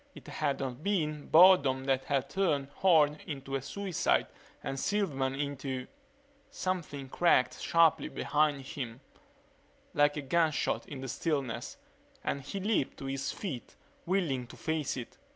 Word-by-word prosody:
It - - -12
had 145 -3 -1
not 130 0 -4
been 155 -6 -1
boredom 155 -7 +6
that 135 -1 0
had 140 -2 0
turned 150 -8 0
Horne 155 -5 +4
into 135 -3 -6
a 135 - 0
suicide 190 +5 0 0.4
and 135 - -3
Silverman 140 -11 0
into 135 -2 -3 0.6
Something 175 - -3
cracked 130 -3 +2
sharply 165 -2 +4
behind 150 -2 +1
him, 130 -2 -6 0.9
like 145 0 +3
a 150 - -3
gunshot 160 +2 +1
in 140 -3 -7
the 135 - -5
stillness, 135 - -2 0.5
and 140 - -2
he 170 +9 -5
leaped 200 -8 0
to - - -7
his 135 +1 -2
feet, 150 - -6 0.3
whirling 160 -10 0
to - - -12
face 155 -4 -2
it. 120 - -8
145 Hz, 140 wpm, -31 LUFS, 135-165 Hz, 0.9 s, boredom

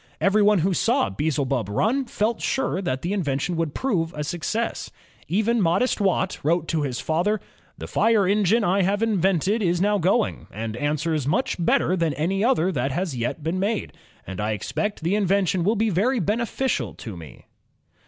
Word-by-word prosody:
Everyone 210 +1 +4
who 190 - +2
saw 250 +8 +1
Beelzebub 140 -7 -1
run 230 - +1
felt 230 -1 -1
sure 265 -8 -1
that 130 -8 -2
the 180 +4 -1
invention 165 -2 -1
would 165 -3 -2
prove 175 -11 -1
a 150 - -3
success. 180 +9 -3 0.4
Even 220 +4 +1
modest 190 +7 +1
Watt 190 -1 0
wrote 165 +2 +1
to 160 -2 0
his 130 -4 -2
father: 180 +7 0 0.4
'^The - - -6
fire 220 -4 +3
engine 210 +3 +3
I 195 +1 +2
have 200 +4 +1
invented 195 0 +1
is 175 -3 +1
now 205 +2 +2
going, 195 +6 0
and 110 +1 -5
answers 150 +2 -1
much 180 - 0
better 170 +2 +2
than 165 -5 0
any 190 +6 0
other 205 -8 +2
that 135 -4 -1
has 175 -1 -2
yet 120 +6 -3
been 165 +4 -1
made, 205 +2 -1 0.3
and 95 +1 -5
I 110 +1 0
expect 205 - -3
that - - -13
the 170 +4 +1
in 205 -2 +1
vention 190 -2 +1
will 210 +6 +2
be 220 0 +1
very 230 +8 +1
beneficial 230 +6 -1
to 110 -6 -8
me." 80 -3 -12
185 Hz, 185 wpm, -24 LUFS, 155-210 Hz, 0.4 s, Everyone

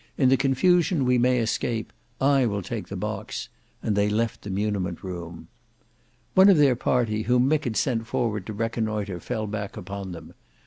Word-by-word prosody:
"In 130 -3 +4
the 135 - +6
confusion 150 +4 +2
we 125 0 +3
may 125 +1 +3
escape. 115 0 -1 0.3
I 135 -2 +3
will 100 -2 -2
take - - -5
the - - -6
box," - - -4 0.3
and 105 - 0
they 100 0 +2
left 110 +2 -1
the 100 - -8
muniment 95 -3 -2
room. 85 -3 -7 0.9
One 190 +2 +7
of 190 - +6
their 140 -4 +5
party 115 -3 0
whom 125 +3 +3
Mick 155 +1 +1
had 115 -3 -2
sent 115 -5 0
forward 110 -5 -1
to 110 - -4
reconnoitre 110 -3 -2
fell 110 +5 -3
back 100 -1 -5
upon 100 +1 -6
them. 80 -2 -10
110 Hz, 180 wpm, -25 LUFS, 100-125 Hz, 0.9 s, One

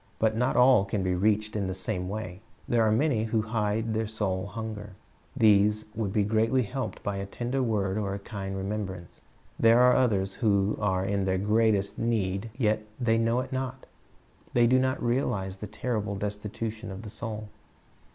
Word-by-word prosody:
But 110 0 +2
not 125 +3 +1
all 125 -4 +6
can 100 0 -2
be 90 -1 +1
reached 105 +3 +1
in 100 -3 -1
the 95 - -3
same 90 -1 -3
way 100 -3 -5 0.3
There 120 -1 +2
are 110 - +3
many 115 -1 +2
who 110 -1 0
hide 110 0 -1
their 110 0 -1
soul 100 -4 -2
hunger. 105 -2 -6 0.4
These 105 -2 +4
would 110 -3 -2
be 105 0 +2
greatly 110 +5 +2
helped 110 -1 -5
by 100 -1 -2
a 100 0 -4
tender 125 +6 -2
word 105 -4 0
or 100 -2 -2
a 100 - -9
kind 95 -3 -5
remembrance. 95 -3 -5 0.4
There 115 +1 +6
are 125 0 +6
others 100 -7 +2
who 100 -3 +2
are 95 -2 +1
in 100 0 0
the 95 0 +1
greatest 105 0 +1
need 110 -2 -1
yet 110 -4 +1 0.2
they 115 -2 +2
know 115 +2 +2
it 130 - -7
not. 130 0 -4 0.7
They 120 -1 +5
do 130 +2 +4
not 130 +1 0
realize 100 -6 -1
the 105 - -6
terrible 110 -1 -3
destitution 105 +2 -4
of 95 +2 -7
the 105 - -8
soul. 110 -1 -6
110 Hz, 180 wpm, -28 LUFS, 100-115 Hz, 0.7 s, all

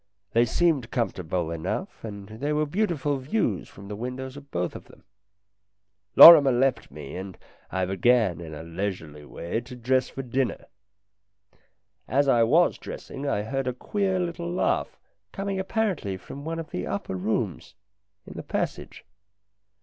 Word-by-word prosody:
They 115 +1 +5
seemed 140 -2 +1
comfortable 90 -8 -2
enough, 80 -1 -4
and 100 -3 -7
there 135 +8 -3
were 155 0 +2
beautiful 150 -5 0
views 130 - -1
from 100 0 -12
the 105 - -5
windows 125 +4 -5
of 140 0 -12
both 90 -4 -2
of - - -9
them. - - -19 1.1
Lorrimer 150 -5 +11
left 130 +2 +1
me, 75 0 -9
and 95 0 -7 0.3
I 95 -1 -1
began, 95 -1 +2
in 80 -2 -8
a 80 - -8
leisurely 85 -4 -5
way, 85 +9 -4
to 125 +2 -10
dress 130 +1 +1
for 135 - -6
dinner. 130 +1 -2 1.4
As 140 +2 +2
I 120 -3 +4
was 155 +10 +3
dressing 140 +1 -7
I 105 -6 0
heard 135 +4 -3
a 125 - 0
queer 190 +8 -1
little 170 -1 -3
laugh 180 - 0 0.3
coming 195 -1 -3
apparently 190 - -1
from 140 +9 -10
one 165 +1 -3
of 165 -2 -7
the 90 - -3
upper 100 -1 -3
rooms, 100 -1 -2 0.5
in - - -10
the - - -6
passage. - - -4
125 Hz, 155 wpm, -26 LUFS, 95-145 Hz, 1.4 s, Lorrimer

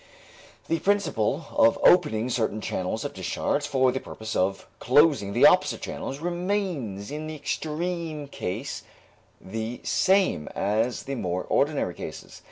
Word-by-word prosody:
The 165 - 0
principle 165 - 0
of 115 - +4
opening 130 -10 +4
certain 110 -3 0
channels 105 +5 -3
of 145 - -4
discharge 95 - -1
for 130 -3 +3
the 130 - -2
purpose 110 -3 -7
of 95 +1 0
closing 135 -5 +4
the - - +5
opposite - - +4
channels 135 - -5
remains 175 - -2
in 155 +1 -5
the 155 - -5
extreme 160 0 -3
case 120 0 -4 0.6
the 110 +4 -5
same 190 - +2
as 110 +4 0
in - - -23
the 135 -3 -4
more 90 -1 -2
ordinary - - +1
cases. - - -9
135 Hz, 140 wpm, -26 LUFS, 110-160 Hz, 0.6 s, the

